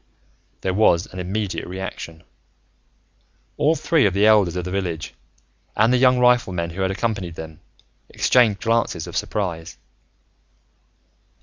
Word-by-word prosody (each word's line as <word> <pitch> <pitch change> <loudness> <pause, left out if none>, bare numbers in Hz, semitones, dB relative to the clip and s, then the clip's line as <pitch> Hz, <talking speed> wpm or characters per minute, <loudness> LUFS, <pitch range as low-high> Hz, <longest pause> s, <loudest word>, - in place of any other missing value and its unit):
There 95 - -1
was 90 -4 +3
an 95 - -7
immediate 95 +2 -3
reaction: 90 -3 -7 1.3
all 155 +3 +2
three 160 -8 +2
of 95 - -2
the 100 +2 +3
elders 105 -5 +4
of 90 -1 -3
the 90 - -5
village, 90 -5 -3 0.6
and 115 +4 +3
the - - +4
young 130 0 +4
riflemen 120 -9 +2
who 95 +3 -6
had 95 - +1
accompanied 95 -4 -3
them, 80 0 -9 0.5
exchanged 110 -6 +2
glances 115 -7 0
of 85 - -9
surprise. 85 -6 -3
95 Hz, 130 wpm, -21 LUFS, 85-110 Hz, 1.3 s, elders